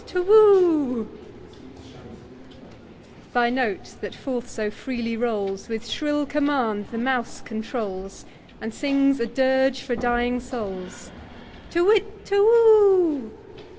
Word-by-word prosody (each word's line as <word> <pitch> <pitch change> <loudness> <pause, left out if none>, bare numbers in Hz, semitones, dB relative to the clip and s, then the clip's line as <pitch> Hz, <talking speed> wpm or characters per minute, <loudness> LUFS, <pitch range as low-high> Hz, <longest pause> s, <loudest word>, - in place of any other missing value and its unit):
Thy 240 -1 +2
note, 245 -6 -3
that - - -7
forth 250 -2 -5
so 215 -2 -4
freely 235 0 -5
rolls, 210 -4 -3
With 225 +1 -5
shrill 295 +4 -2
command 265 -8 -1
the 230 - -7
mouse 245 0 -2
controls, 215 -4 -7 0.3
And 225 0 -7
sings 275 0 +1
a 235 - -1
dirge 265 +2 +1
for 250 -2 -3
dying 240 +1 -1
souls, 210 -7 -8 0.6
Te 340 - 0
whit, 420 +2 +1
te 400 - -2
whoo 400 - +5
245 Hz, 105 wpm, -23 LUFS, 225-285 Hz, 0.6 s, whoo